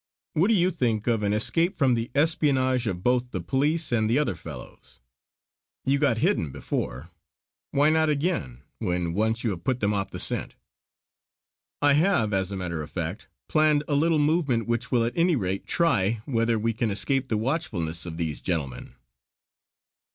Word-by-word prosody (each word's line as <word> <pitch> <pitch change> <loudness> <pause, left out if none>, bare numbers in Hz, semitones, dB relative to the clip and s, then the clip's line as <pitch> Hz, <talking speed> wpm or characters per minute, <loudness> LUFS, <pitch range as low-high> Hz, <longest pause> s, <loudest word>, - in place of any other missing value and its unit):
What 170 +6 +3
do 225 - +3
you 180 -1 +3
think 115 - -1
of 115 -3 +1
an 100 -1 0
escape 165 - +1
from 135 -4 +3
the 115 0 -2
espionage 135 -5 +2
of 90 -3 -3
both 125 0 +1
the 95 - -4
police 145 - 0
and 110 -2 +1
the 115 - +2
other 150 - +1
fellows. - - -11 0.9
You 140 +1 +2
got 140 -6 +2
hidden 80 -8 +1
before; 65 +4 -4 0.6
why 145 +2 +3
not 160 0 +2
again, 140 - -2 0.2
when 90 -1 -1
once 110 +4 0
you 115 - 0
have 85 -3 -6
put 130 -2 0
them 105 -1 +1
off 100 -1 -2
the - - -7
scent. - - +1 1.3
I 145 -1 +6
have 150 - +2
as 95 0 0
a 100 - -4
matter 85 -4 -3
of 75 - -7
fact 90 +4 -5 0.2
planned 155 -1 +3
a 150 - -1
little 160 +3 +3
movement 145 -6 +1
which 120 +2 -2
will 120 -3 +3
at 120 - -2
any 170 0 +3
rate 95 -5 -3
try 115 - +1
whether 115 -3 +1
we 115 +1 0
can 110 +1 -1
escape 130 +6 0
the 110 - 0
watchfulness 105 - -2
of 80 -1 -6
these 80 -3 -3
gentlemen." 80 -8 -4
120 Hz, 180 wpm, -26 LUFS, 100-145 Hz, 1.3 s, I